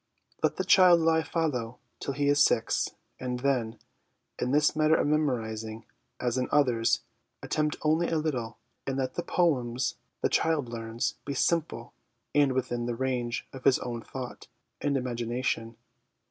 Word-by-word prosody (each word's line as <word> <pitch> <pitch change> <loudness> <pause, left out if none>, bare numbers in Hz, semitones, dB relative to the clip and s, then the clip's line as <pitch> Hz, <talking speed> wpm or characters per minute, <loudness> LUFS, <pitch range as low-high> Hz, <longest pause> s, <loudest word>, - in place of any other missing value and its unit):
Let - - +2
the 190 - -1
child 185 -2 +7
lie 160 0 +3
fallow 130 -8 -2 0.2
till 140 - -3
he 145 0 +1
is 145 0 +5
six, - - +1 0.2
and 125 -1 -3
then, 120 -5 0 0.6
in 125 - 0
this 150 +3 +3
matter 155 +1 +4
of - - +2
memorising, 115 -7 -1 0.3
as 125 +1 0
in 125 - 0
others, 125 -6 +3 0.4
attempt 150 0 0
only 160 +3 +2
a 165 - +1
little, 125 -8 -2 0.3
and 135 -1 -1
let 130 -1 -1
the - - -2
poems 130 -9 0 0.2
the - - +3
child 155 -6 +1
learns 115 -1 -3
be 140 - -4
simple 150 -6 0 0.4
and 145 -2 +4
within 120 -2 -1
the 120 - -2
range 125 -2 -2
of 130 -1 -9
his 135 - +5
own 120 -2 -5
thought 125 +2 -8 0.3
and 145 -1 +1
ima 125 -2 -2
gination. 120 -1 -2
130 Hz, 160 wpm, -28 LUFS, 120-150 Hz, 0.6 s, child